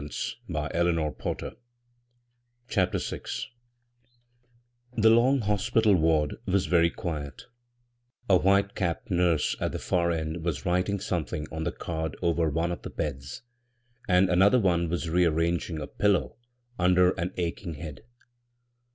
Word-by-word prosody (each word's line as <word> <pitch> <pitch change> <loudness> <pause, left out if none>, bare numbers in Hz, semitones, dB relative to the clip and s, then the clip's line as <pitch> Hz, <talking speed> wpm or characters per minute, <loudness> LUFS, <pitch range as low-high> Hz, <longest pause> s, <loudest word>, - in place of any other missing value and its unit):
54 75 0 -4
b, 85 - +1 0.4
Google - - -3 1.2
CHAPTER 95 -7 +1
VI - - -4 1.8
THE 110 0 +6
long 125 +4 +4
hospital 105 +1 +2
ward 80 -3 +2
was 95 0 +2
very 85 -2 +3
quiet 80 -9 -5 0.8
A 95 - +5
white 100 +2 +3
capped 95 +3 -3
nurse 85 -4 +2
at - - -2
the - - -2
far 85 -1 0
eod 80 0 -2
was 80 -5 -3
writing 90 +3 +1
something 85 -6 -3
on 80 0 -4
the 85 - 0
card 80 -2 -4
over 85 -1 +2
one 85 +3 -1
cA 85 - -4
the - - -7
beds; 70 - -5 0.6
and 90 0 +4
another 95 +7 +5
one 85 -5 +1
was 85 0 -2
rearranging 85 -1 +1
a 75 - -4
pillow 95 -11 0 0.4
under 90 0 +4
an 85 -1 -3
ach 85 -2 -2
ing 85 -3 -5
head. 75 -1 -8
85 Hz, 135 wpm, -27 LUFS, 80-95 Hz, 1.8 s, THE